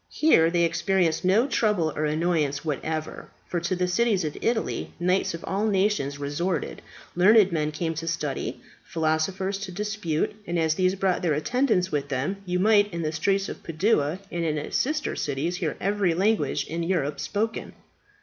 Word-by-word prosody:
Here 165 - +4
they 170 0 +2
experienced 170 0 +1
no 195 +7 +4
trouble 210 - +1
or 155 - 0
annoyance 155 -2 0
whatever, 155 +1 -4 0.2
for 175 - -1
to 175 +2 -1
the 180 0 0
cities 200 0 +2
of 150 -2 -3
Italy 230 -1 -1
knights 180 0 +1
of 165 - -9
all 200 +3 0
nations 195 -8 +1
resorted, 145 +6 -2 0.3
learned 200 +2 +6
men 155 -2 0
came 165 +1 -2
to 165 +1 -5
study, 160 -4 -3 0.2
philosophers 180 +5 -1
to 200 -2 -6
dispute, 210 -3 -2
and 175 0 -1
as 160 -1 +2
these 185 +2 +1
brought 190 -1 0
their 165 -4 +1
attendants 190 - +1
with 145 -2 -2
them, 145 +8 -1
you 180 0 0
might 205 +1 +4
in 170 -1 -3
the 155 - -1
streets 195 +5 0
of - - -7
Padua 165 -2 +1
and 170 -1 -2
its 150 -2 -2
sister 305 +3 0
cities 150 +5 -2
hear 165 -5 -2
every 195 -3 +1
language 210 +5 +1
in 165 +1 -4
Europe 165 -5 -1
spoken. 225 +2 -2
175 Hz, 170 wpm, -25 LUFS, 155-195 Hz, 0.3 s, learned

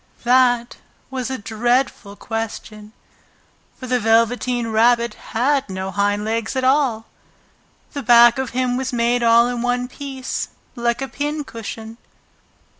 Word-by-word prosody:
That 245 -1 +3 0.3
was 260 -1 -3
a 260 - -3
dreadful 230 0 -1
question, 215 -1 -6 0.9
for 255 - -7
the 250 0 0
Velveteen 230 +1 +1
Rabbit 235 +1 +3
had 265 +4 -1
no 190 0 -4
hind 205 +1 0
legs 225 +3 -2
at 260 - -1
all! 260 -5 +2 0.9
The 285 - -4
back 240 0 +6
of 265 -2 -2
him 250 0 -1
was 260 0 -3
made 240 0 +1
all 235 0 +5
in 245 -1 -3
one 245 0 -1
piece, 265 -1 -5 0.3
like 235 +1 -1
a - - -3
pincushion. 230 -7 -6
240 Hz, 130 wpm, -20 LUFS, 225-255 Hz, 0.9 s, back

